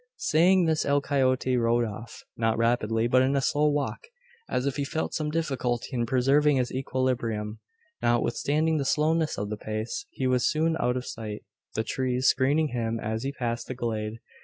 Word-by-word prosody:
Saying 175 +3 +4
this 160 -1 +1
El 140 0 +2
Coyote 130 -2 +1
rode 120 0 +2
off, 115 +2 -8
not 115 -1 +1
rapidly, 115 -1 +1
but 130 +1 +4
in 135 +2 +2
a - - +3
slow 145 +3 +2
walk, 145 - -2 0.4
as 125 - -1
if 140 0 -1
he 145 - 0
felt 160 +3 -3
some 155 -1 -1
difficulty 135 -7 -1
in 120 -3 -1
preserving 140 +3 +3
his 125 -2 0
equilibrium. 120 -5 -2 0.4
Notwithstanding 145 +7 +1
the 140 - 0
slowness 155 +3 +1
of 105 +1 -3
the 105 - -3
pace 110 - -4
he 130 - -4
was 125 -1 +2
soon 160 +1 +1
out 125 +1 +1
of 125 - -4
sight, 105 -2 -6 0.3
the 110 - 0
trees 130 +1 -1
screening 145 +4 +3
him 115 -2 -2
as 110 +1 -3
he 135 +2 -2
passed 120 -4 -3
the 130 - -5
glade. 110 -3 -3
130 Hz, 185 wpm, -27 LUFS, 115-145 Hz, 0.4 s, Saying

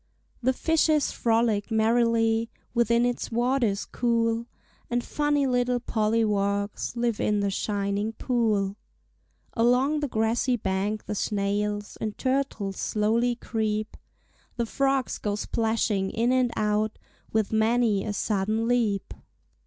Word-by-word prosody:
The 255 +2 +3
fishes 310 +1 +2
frolic 225 -2 +1
merrily 225 0 +2 0.2
Within 235 0 +3
its 245 0 -2
waters 240 -3 +1
cool, 230 -1 0 0.4
And 240 0 0
funny 295 -1 +1
little 245 -1 +1
polliwogs 210 -3 0
Live 235 -2 0
in 210 -1 +1
the 200 -1 0
shining 200 +2 -1
pool. 215 -6 0 0.8
Along 250 +6 +3
the 295 - -1
grassy 230 +2 +1
bank 205 0 -2
the - - -3
snails 205 0 -2
And 215 -1 -3
turtles 255 -7 -1
slowly 230 +3 +1
creep; 215 -2 -2 0.6
The 235 - -1
frogs 270 +2 0
go 205 -1 -1
splashing 220 -2 0
in 235 +4 +1
and 255 -1 +3
out 210 0 0 0.3
With 220 -1 0
many 220 -2 +2
a 210 - -3
sudden 215 +2 0
leap. 225 -5 0
225 Hz, 120 wpm, -26 LUFS, 210-245 Hz, 0.8 s, The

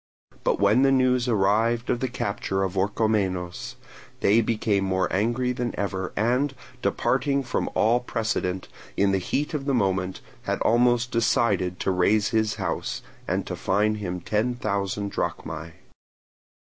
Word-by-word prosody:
But - - +1
when 100 +5 +4
the 135 0 +5
news 130 -1 +3
arrived 115 +2 +2
of 120 - 0
the 130 - -1
capture 100 -5 -2
of 95 0 -2
Orchomenos, 95 -3 -1 0.5
they 110 +4 +5
became 110 -3 0
more 95 -1 +1
angry 120 +5 +1
than 120 -1 -3
ever, 95 -2 -2
and, 125 +6 +1 0.3
departing 140 -1 +1
from 125 - -2
all 115 +3 +3
precedent, 110 -6 -2 0.3
in 100 0 +3
the 95 - +2
heat 145 - -2
of 145 -3 -2
the 140 -2 +1
moment 95 -4 0 0.2
had - - -1
almost 120 +1 +3
decided 100 -6 +1
to - - +1
raze 100 +4 +2
his 110 -1 +1
house, - - -3 0.2
and - - -1
to - - -4
fine 105 +2 +1
him 90 -4 -4
ten 110 +7 0
thousand 100 -2 -2
drachmae. 80 +1 -4
105 Hz, 150 wpm, -25 LUFS, 95-120 Hz, 0.5 s, the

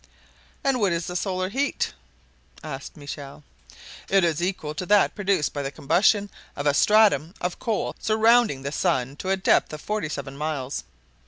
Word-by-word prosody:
"And 270 -2 +2
what 200 -5 +2
is 170 0 -2
the 180 - -5
solar 185 0 -1
heat?" 275 +7 -1 0.7
asked 140 -1 -7
Michel. 145 0 -8 0.7
"It 195 -1 +4
is 165 -2 +1
equal 175 -4 -2
to 170 +4 -4
that 205 +1 +4
produced 195 -7 0
by 145 - -3
the 135 - -3
combustion 200 +8 +2 0.2
of 145 - -4
a 145 - +4
stratum 200 -3 +4
of 180 0 -3
coal 225 -3 -2
surrounding 220 - +3
the 140 - -3
sun 140 -6 0
to 185 - -5
a 195 - +2
depth 190 - +2
of 155 - -5
forty 210 -6 -2
seven 140 -2 -5
miles." 145 -3 -3
175 Hz, 170 wpm, -25 LUFS, 145-205 Hz, 0.7 s, It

